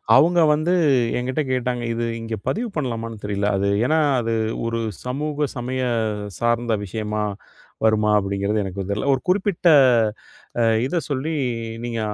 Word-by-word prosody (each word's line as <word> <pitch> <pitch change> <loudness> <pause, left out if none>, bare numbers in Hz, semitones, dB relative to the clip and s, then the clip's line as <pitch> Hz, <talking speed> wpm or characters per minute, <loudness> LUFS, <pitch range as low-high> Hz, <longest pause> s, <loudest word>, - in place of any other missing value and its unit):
அவங்க 175 +2 +5
வந்து 155 +4 +1 0.4
என்கிட்ட 130 +4 -1
கேட்டாங்க, 125 -1 -1
"இது 115 0 -2 0.2
இங்கே 115 -1 -4
பதிவு 235 +3 -1
பண்ணலாமான்னு 115 -6 -4
தெரியல" 100 0 -1
அது 100 +1 0 0.2
ஏன்னா 155 +4 +3 0.2
அது 115 0 -1 0.3
ஒரு 115 0 -2 0.3
சமூக 145 +3 -2
சமய 130 +2 -2 0.6
சார்ந்த 120 0 +1
விஷயமா 105 +1 -3 0.6
வருமா 110 -1 +3
அப்படிங்கிறது 100 +1 -1
எனக்கு 95 0 -5
தெரில. 105 +6 -2
ஒரு - - -6
குறிப்பிட்ட 190 -1 +1 0.9
அ - - +4 0.2
இதை 155 +7 -1
சொல்லி, 145 +3 -2 0.5
"நீங்க 120 -1 -3
120 Hz, 135 wpm, -22 LUFS, 110-145 Hz, 0.9 s, அவங்க